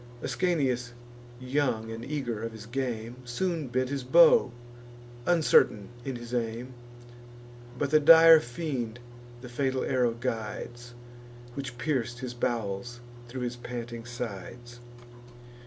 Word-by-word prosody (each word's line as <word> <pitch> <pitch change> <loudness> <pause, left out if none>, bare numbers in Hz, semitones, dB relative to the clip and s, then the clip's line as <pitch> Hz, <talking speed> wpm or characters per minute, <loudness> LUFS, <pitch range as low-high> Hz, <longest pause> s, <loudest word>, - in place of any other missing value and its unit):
Ascanius 130 -9 0 0.5
young, 125 -4 -1
and 115 +1 -6
eager 125 -6 -3
of 115 0 -4
his 110 -1 -10
game, 120 -1 -4
Soon 155 +5 -2
bent 130 +1 -1
his 140 -2 -3
bow, 160 -1 +6 0.8
uncertain 155 - +4
in 135 -1 -4
his 120 0 -8
aim; 120 +1 -3 1.0
But 140 +1 -1
the 155 - +6
dire 165 +1 +9
fiend 120 -3 -4 0.4
the 125 - -8
fatal 130 +1 -1
arrow 125 -3 +1
guides, 120 0 -5 0.6
Which 130 -2 -6
pierc'd 120 -4 -1
his 125 -1 -5
bowels 120 0 -3 0.3
thro' 125 +1 -6
his 120 0 -3
panting 120 -1 -6
sides. 120 +1 -7
120 Hz, 120 wpm, -28 LUFS, 120-135 Hz, 1.0 s, dire